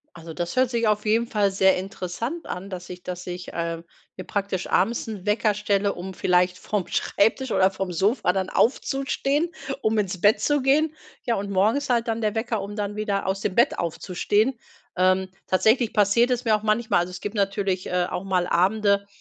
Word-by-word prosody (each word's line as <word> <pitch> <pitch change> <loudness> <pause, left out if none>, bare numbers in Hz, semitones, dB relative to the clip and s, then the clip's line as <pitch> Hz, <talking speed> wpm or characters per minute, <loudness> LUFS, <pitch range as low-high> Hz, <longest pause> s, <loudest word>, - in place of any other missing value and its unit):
Also, 165 -1 -9
das 175 0 -3
hört 255 -1 +3
sich 235 -2 0
auf 210 0 +1
jeden 225 +2 +3
Fall 210 -3 +1
sehr 190 0 +3
interessant 195 - -5
an, 190 +2 -6
dass 180 -2 -7
ich 180 0 -8
dass 180 0 -6
ich, 180 0 -6
äh, 170 0 -3 0.4
mir 185 - -7
praktisch 200 -2 -2
abends 230 +5 +1
'n 205 -4 -7
Wecker 210 0 +2
stelle, 200 -1 0
um 190 +2 -7
vielleicht 180 0 +1
vom 205 -4 -2
Schreibtisch 235 +6 +1
oder 190 0 +3
vom 190 -1 -4
Sofa 190 +4 +1
dann 190 0 -2
aufzustehen, 275 +5 +1 0.3
um 220 0 +1
ins 190 -3 -1
Bett 205 +3 +5
zu 290 -1 +1
gehen. 295 +4 +2 0.3
Ja, 235 - +1
und 200 0 -4
morgens 215 +9 +1
halt 235 -1 +1
dann 225 0 -1
der 215 0 0
Wecker, 225 -1 -1
um 200 +1 -6
dann 205 -1 -3
wieder 205 -2 -1
aus 195 +1 -1
dem 190 -2 -2
Bett 240 +4 +3
aufzustehen. 205 +8 0 0.4
Ähm, 185 +1 +2 0.2
tatsächlich 220 +5 +2
passiert 210 +4 +3
es 250 0 -1
mir 220 -2 +4
auch 210 - -3
manchmal 215 -1 +2
also 175 +1 -1
es 180 - -7
gibt 205 - -5
natürlich, 195 -2 -1
äh, 180 0 +1
auch 180 - -4
mal 185 -2 0
Abende, 200 +3 +2
200 Hz, 200 wpm, -24 LUFS, 185-225 Hz, 0.4 s, Bett